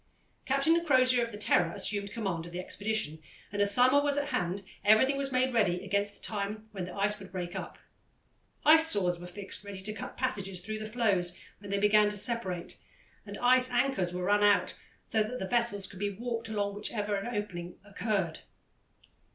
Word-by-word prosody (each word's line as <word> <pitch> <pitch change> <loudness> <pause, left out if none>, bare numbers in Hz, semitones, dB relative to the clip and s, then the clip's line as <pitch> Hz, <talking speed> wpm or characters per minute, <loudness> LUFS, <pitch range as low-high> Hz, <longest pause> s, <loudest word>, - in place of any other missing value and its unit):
Captain 320 +5 +2
Crozier, 255 -5 +4
of 230 - -4
the 205 - -7
Terror, 175 -5 +2
assumed 200 -1 +1
command 190 -8 -3
of - - -11
the 175 - -5
expedition, 200 -4 -2 0.3
and 205 0 -1
as 200 0 +4
summer 255 +6 +6
was 285 0 +1
at 285 0 -1
hand, 195 -6 -2 0.2
everything 220 +7 +5
was 275 0 -2
made 255 0 +1
ready 195 -5 +1
against 200 +1 -1
the - - -10
time 215 +1 -4
when 190 -4 -5
the 180 - -9
ice 205 +1 0
would 195 -2 -11
break 180 -2 -5
up. - - -6 0.9
Ice 320 +1 +7
saws 180 - +1
were 175 - -8
fixed 195 +3 -8
ready 200 -1 -7
to 215 +2 -3
cut 210 - -8
passages 200 -8 -2
through 215 +4 -5
the 215 - -5
floes 200 -7 +1 0.2
when 200 0 -10
they 200 - 0
began 210 +1 +4
to 210 - -5
separate, 195 -6 -2 0.5
and - - -6
ice 255 +1 +5
anchors 245 -7 +1
were 180 0 -4
run 205 +2 +3
out 205 -1 +3 0.3
so 220 - +1
that 220 +4 -2
the 190 - -4
vessels 235 -3 0
could 190 - -10
be 205 0 0
warped 230 +2 -4
along 205 -2 -1
whenever 210 0 -2
an 210 +4 -3
opening 175 -4 -5
occurred. 200 -4 -2
205 Hz, 195 wpm, -30 LUFS, 195-240 Hz, 0.9 s, Ice